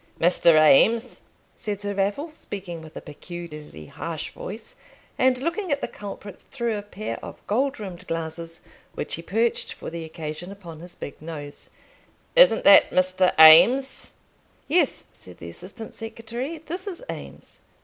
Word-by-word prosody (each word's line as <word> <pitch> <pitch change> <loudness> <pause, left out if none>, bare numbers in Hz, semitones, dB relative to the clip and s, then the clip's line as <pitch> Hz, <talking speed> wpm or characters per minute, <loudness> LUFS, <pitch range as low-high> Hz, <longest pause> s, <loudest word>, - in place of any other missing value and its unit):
"Mr. 170 -1 +5
Eames?" 225 - +4 0.3
said 205 -2 -4
Sir 205 0 -3
Raffle, 200 +11 -1
speaking 185 - -7
with 160 0 -11
a - - -6
peculiarly 150 - -9
harsh - - -6
voice, - - -8 0.4
and 255 -1 +3
looking 335 +6 -2
at 285 - +1
the - - -3
culprit 200 -1 -9
through 235 -4 -2
a 205 - -3
pair 205 +1 -6
of - - -10
gold 265 +5 0
rimmed 185 -3 -8
glasses, 165 0 -5 0.3
which - - -4
he 165 - -3
perched 225 +7 0
for - - -8
the 170 0 -5
occasion 160 +2 -7
upon 175 -6 -10
his 175 +1 -11
big 145 - -9
nose. 150 -3 -8 0.7
"Isn't - - +6
that - - +8
Mr. 185 0 +3
Eames?" 235 +13 +7 0.5
"Yes," 315 -1 +1
said 90 - -14
the 85 - -9
assistant 200 - -9
secretary, 230 +7 -6
"this 345 +5 -7
is 395 +4 -6
Eames." - - -9
195 Hz, 150 wpm, -24 LUFS, 165-250 Hz, 0.7 s, that